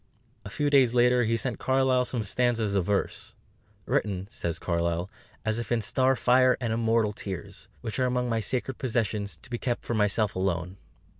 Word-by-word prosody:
A - - -8
few 145 +6 -1
days 130 -4 +4
later 125 0 +4
he 115 +1 +1
sent 120 0 -2
Carlyle 130 -1 +2
some 120 -3 -2
stanzas 115 -1 0
of 95 -3 +1
verse, 100 -1 -2 0.5
"written," 95 -2 -1
says 85 -1 -3
Carlyle, 85 +1 -1 0.3
"as 110 +1 0
if 120 - -6
in 120 - +3
star 130 +5 +2
fire 130 +1 +4
and 120 -3 -1
immortal 115 -2 +1
tears; 100 0 -7
which 115 +1 -4
are 130 - +2
among 125 0 0
my 115 -1 0
sacred 125 +3 -1
possessions, 110 -5 -1
to - - -15
be 120 - -2
kept 120 -2 -2
for - - -2
myself 105 -1 +1
alone." 90 0 -2
115 Hz, 180 wpm, -27 LUFS, 100-125 Hz, 0.5 s, days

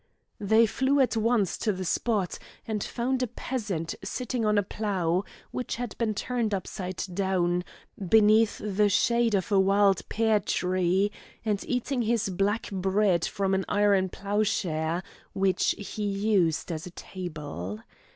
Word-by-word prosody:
They 220 +3 +4
flew 265 +5 +1
at 260 -3 +3
once 220 -4 +1
to 220 - +1
the 185 -1 -4
spot, 205 -1 0 0.3
and 215 -2 -2
found 255 +2 -1
a 250 - +1
peasant 205 -10 -3
sitting 250 -1 -3
on 210 0 +3
a 205 - +3
plough, 190 -3 -1 0.3
which 250 - -3
had 240 -3 -5
been 220 -3 0
turned 230 -2 -1
upside 185 0 -4
down, 180 -2 +1 0.5
beneath 220 +1 +5
the 210 0 +1
shade 235 +2 +3
of 195 +3 -1
a 200 - +5
wild 195 0 +4
pear 220 -1 +2
tree, 185 0 +1 0.3
and 210 -2 0
eating 250 +1 -1
his 225 -2 +1
black 200 +4 0
bread 190 -2 +2
from 195 -1 -1
an 190 0 +1
iron 200 -2 +3
ploughshare, 180 -5 -1 0.3
which 190 -1 +2
he 205 +1 -6
used 195 -5 +1
as 160 +2 -5
a 175 - -13
table. 150 - -6
200 Hz, 145 wpm, -27 LUFS, 185-220 Hz, 0.5 s, beneath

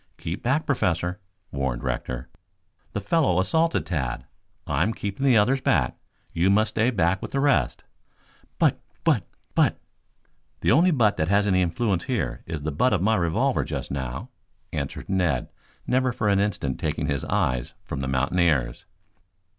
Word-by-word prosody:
"Keep 85 +3 -5
back, 140 +6 +1
Professor," 90 - 0 0.3
warned 65 -3 -2
Rector. 65 0 -3 0.7
"The - - -1
fellow 115 - +2
assaulted 160 - +1
Tad. 65 -7 -3 0.4
I 75 0 0
am 105 +6 +1
keeping 100 +6 -4
the 125 -4 +6
others 130 +6 +3
back. 70 - +2 0.4
You 85 +3 +2
must 110 +2 +3
stay 110 +2 +1
back 90 -5 +1
with - - -5
the 135 - -1
rest." 140 0 +2 0.7
"But - - +3 0.2
but - - +2 0.3
but - - +3 0.4
" - - -43
"The - - +3
only 165 +9 +5
'but' 115 - +3
that 80 - 0
has 100 +2 +3
any 95 -2 +3
influence 90 +1 0
here 65 - -2
is 80 -3 -4
the 80 - -1
butt 125 - +2
of 95 -3 +1
my 110 +2 +3
revolver 85 -5 +1
just - - -5
now," 65 -1 -4 0.4
answered 70 -1 -4
Ned, 90 -9 0 0.4
never 130 0 +2
for 110 -3 0
an 100 -1 +3
instant 100 -10 -1
taking - - -1
his 70 -1 -1
eyes 70 -12 -1
from - - -5
the 65 - -2
mountaineers. 65 -1 +1
95 Hz, 165 wpm, -25 LUFS, 70-110 Hz, 0.7 s, the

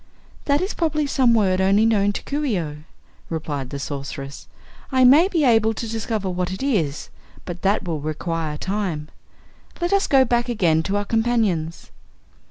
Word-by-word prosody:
"That 285 0 +2
is 375 - -2
probably 310 -3 0
some 255 -4 +3
word 190 -4 +2
only 200 +3 +4
known 205 -3 +3
to - - -5
Coo 290 +2 -3
ce 245 -9 0
oh," 155 -4 -4 0.5
replied 145 -5 -4
the 140 - -5
Sorceress. 140 0 -6 0.4
"I 260 -1 +3
may 290 +8 +7
be 340 -6 0
able 225 -3 +3
to 230 - -4
discover 220 -2 -3
what 180 0 -2
it 190 +7 -5
is, 170 - -1 0.4
but 175 -1 -7
that 200 +2 +1
will 165 -4 -3
require 155 0 -3
time. 185 -5 -3 0.7
Let 350 +2 0
us 395 - +2
go 265 -2 +5
back 240 0 0
again 170 -9 +2
to 195 +5 -1
our 205 - -2
companions." 220 -8 0
205 Hz, 175 wpm, -22 LUFS, 165-245 Hz, 0.7 s, may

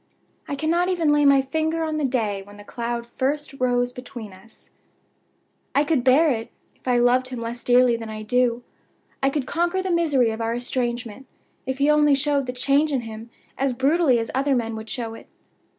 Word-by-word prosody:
I 285 - -3
cannot 335 +5 +1
even 335 -5 +2
lay 295 0 +3
my 275 -1 +5
finger 315 +4 -1
on 310 -1 -2
the 305 - -1
day 220 -6 -1
when 205 +1 -14
the 205 - -11
cloud 235 +2 -4
first 275 +4 -2
rose 245 -1 +1
between 245 -5 -9
us. 190 +5 -18 1.0
"I 285 - +4
could 300 -5 +1
bear 280 +5 +5
it, 225 -2 -3 0.3
if - - -19
I 250 -1 +3
loved 245 +1 +3
him 255 -2 -6
less 235 +1 -5
dearly 245 -1 +4
than 225 -1 -6
I 215 0 -6
do. 245 +1 +1 0.6
I 270 - +3
could 275 -1 -2
conquer 345 +5 0
the 375 - -2
misery 290 -9 +2
of 220 +1 -5
our 230 +1 -1
estrangement, 245 0 -3 0.4
if 265 0 -2
he 280 +1 +2
only 300 -1 +5
showed 280 -1 0
the - - -1
change 280 +4 +1
in 265 -3 0
him 225 0 -9 0.3
as 270 -1 +1
brutally 275 +1 +3
as 230 -1 -3
other 275 +1 +1
men 230 -2 -2
would 220 0 -8
show 230 -3 -4
it. - - -12
255 Hz, 200 wpm, -23 LUFS, 235-290 Hz, 1.0 s, my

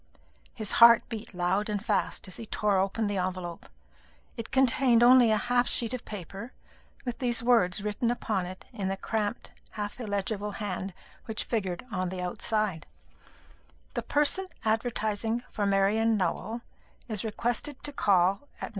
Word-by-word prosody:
His 215 -4 0
heart 235 -1 +8
beat 220 -2 -6
loud 185 +4 0
and 210 0 -2
fast 205 -2 -1
as 185 - -4
he 225 - -7
tore 205 -2 +1
open 195 +4 0
this 205 -2 -1
envelope. 180 -2 -4 0.7
It 230 -1 -6
contained 255 -2 +4
only 245 -1 +7
a 215 - +3
half 245 +3 +1
sheet 235 0 0
of 250 - -5
paper, 205 +4 -8 0.5
with 245 -2 -4
these 240 -2 0
words 215 -5 +3
written 210 +3 -1
upon 215 -6 -1
it 185 +1 -9
in 195 -2 -3
the 195 0 -2
cramped 215 +2 -3 0.2
half 210 +2 -5
illegible 205 -1 -2
hand 195 -3 -4 0.3
which 220 -2 -3
figured 190 -4 -2
on 185 -2 -1
the 185 0 -5
outside: 180 -1 -1 1.1
"The - - -1
person 300 +6 +2 0.2
advertising 220 0 0
for 205 -1 -1
Marian 210 +3 +3
Nowell 205 +5 -2 0.5
is 215 -4 -1
requested 240 +5 -2
to 290 - -5
call 195 +3 +2
at - - -9
No. - - -3
215 Hz, 155 wpm, -28 LUFS, 195-235 Hz, 1.1 s, heart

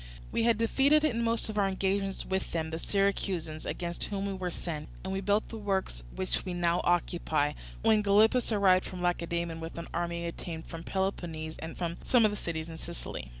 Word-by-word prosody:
We 230 - +1
had 230 -2 +4
defeated 275 +7 +4
in 235 -7 +2
most 230 0 +1
of 215 -1 -2
our 200 - +4
engagements 195 0 0
with 190 0 -2
them 160 -1 -1
the 160 - -3
Syracusans, 185 -5 0
against 170 -1 -3
whom 200 -1 -2
we 200 - -1
were 185 -1 -2
sent, 160 -3 -4
and 190 +1 -3
we 190 - 0
had 195 - -8
built 205 +1 +2
the 225 - -6
works 190 - -1
which 185 - -1
we 180 -2 -3
now 175 0 +2
occupy, 160 -4 +1 0.3
when 220 -1 +5
Gylippus 215 +5 +4
arrived 190 -3 +5
from 180 -1 -6
Lacedaemon 170 -1 0
with 165 +1 -6
an 170 - -5
army 170 0 -1
obtained 165 -1 -6
from 165 -1 -7
Peloponnese 170 -5 -2
and 160 0 -6
from 170 -1 -2
some 245 -3 +5
of 215 - +4
the - - -3
cities 160 -3 -3
in 165 -1 -7
Sicily. 170 - -6
185 Hz, 205 wpm, -30 LUFS, 170-205 Hz, 0.3 s, when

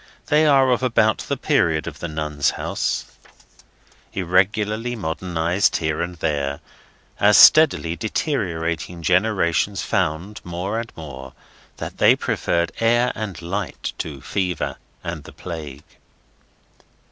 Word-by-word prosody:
They 155 0 +3
are 135 -3 +5
of 125 - +2
about 115 -4 +2
the - - -3
period 80 -2 +1
of - - -7
the 85 - -4
Nuns' 75 -2 -1
House, - - -2 1.1
irregularly 105 +6 +1
modernised 85 -1 0
here 80 -1 -1
and 90 +1 -3
there, 70 -3 -2 0.6
as 105 +1 +6
steadily 140 - +6
deteriorating 85 - -2
generations 90 0 +1
found, 90 +8 -1
more 90 +5 -3
and 115 0 -6
more, 65 -4 -9 0.4
that - - -7
they - - +6
preferred 85 0 -1
air 120 +2 +3
and 105 -4 -5
light 95 +2 -4
to 70 -4 -5
Fever 90 -4 -2 0.3
and - - -5
the - - -12
Plague. 75 -5 -7
90 Hz, 120 wpm, -22 LUFS, 80-110 Hz, 1.1 s, as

